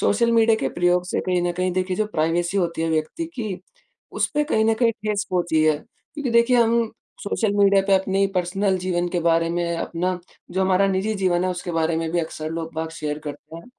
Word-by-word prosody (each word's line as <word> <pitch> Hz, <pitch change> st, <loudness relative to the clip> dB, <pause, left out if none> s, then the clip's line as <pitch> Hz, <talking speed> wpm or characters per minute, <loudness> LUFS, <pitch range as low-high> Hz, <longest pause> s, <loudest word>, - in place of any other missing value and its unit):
Social 235 Hz, +3 st, +2 dB
media 225 Hz, -1 st, +4 dB
के -, -, 0 dB
प्रयोग 175 Hz, 0 st, +2 dB
से -, -, -1 dB
कहीं 180 Hz, -1 st, 0 dB
न 175 Hz, -, 0 dB
कहीं 180 Hz, +1 st, -1 dB
देखिए 185 Hz, 0 st, -1 dB
जो 215 Hz, -, 0 dB
प्राइवेसी 170 Hz, +1 st, 0 dB
होती 170 Hz, -3 st, -1 dB
है, 165 Hz, -, 0 dB
व्यक्ति 160 Hz, -, -1 dB
की 210 Hz, -7 st, -4 dB, 0.5 s
उस -, -, +1 dB
पे 295 Hz, -, +3 dB
कहीं 220 Hz, -8 st, +1 dB
न 225 Hz, 0 st, +3 dB
कहीं 230 Hz, 0 st, +3 dB
ठेस 210 Hz, -1 st, -2 dB
पहुँची 170 Hz, -3 st, +1 dB
है, 155 Hz, -1 st, +3 dB, 0.4 s
क्योंकि 285 Hz, -5 st, -3 dB
देखिए, 235 Hz, +2 st, +4 dB
हम 230 Hz, -1 st, +3 dB, 0.3 s
सोशल 220 Hz, -4 st, 0 dB
मीडिया 200 Hz, -1 st, +5 dB
पे 195 Hz, -, +4 dB
अपनी 190 Hz, +1 st, +2 dB
पर्सनल 190 Hz, +2 st, 0 dB
जीवन 175 Hz, -1 st, -1 dB
के 175 Hz, 0 st, -1 dB
बारे 165 Hz, 0 st, +2 dB
में, 170 Hz, 0 st, -1 dB
अपना 180 Hz, +2 st, -2 dB, 0.3 s
जो 190 Hz, -, -1 dB
हमारा 190 Hz, +1 st, +3 dB
निजी 195 Hz, +3 st, 0 dB
जीवन 185 Hz, -3 st, +1 dB
है 185 Hz, -, +1 dB
उसके 180 Hz, 0 st, -5 dB
बारे 165 Hz, 0 st, +1 dB
में 165 Hz, 0 st, -2 dB
भी 175 Hz, -, +1 dB
अक्सर 155 Hz, -1 st, -5 dB
लोग-बाग 160 Hz, 0 st, -4 dB
शेयर 150 Hz, -1 st, -3 dB
करते 150 Hz, +2 st, -8 dB
हैं। 170 Hz, -, -11 dB
185 Hz, 220 wpm, -23 LUFS, 170-210 Hz, 0.5 s, मीडिया